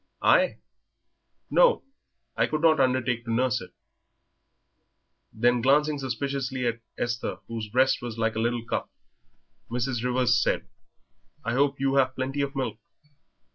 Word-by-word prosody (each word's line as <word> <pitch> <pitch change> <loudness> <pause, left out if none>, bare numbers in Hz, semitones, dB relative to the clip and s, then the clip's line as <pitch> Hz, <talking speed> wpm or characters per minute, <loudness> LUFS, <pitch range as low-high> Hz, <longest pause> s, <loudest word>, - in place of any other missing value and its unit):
"I? - - +4 0.9
No, - - +4 0.5
I - - +2
could 155 0 -2
not 160 -2 +4
undertake 130 -2 +1
to 115 - -3
nurse 125 +2 +1
it." - - -10 1.6
Then, 120 +2 +2
glancing 145 +3 +3
suspiciously 130 0 -3
at 115 -1 -1 0.2
Esther, 120 0 -2
whose 115 -2 -5
breast 130 +5 +2
was 120 -2 -6
like 115 0 0
a - - -1
little 120 0 -1
cup, - - -3 0.8
Mrs. 120 0 -2
Rivers 125 -1 +2
said, - - 0 0.8
"I 115 - -1
hope 140 +2 +1
you 135 0 +1
have 130 -1 +2
plenty 135 +2 -2
of 140 0 -3
milk?" 130 -4 -3
130 Hz, 135 wpm, -26 LUFS, 120-135 Hz, 1.6 s, I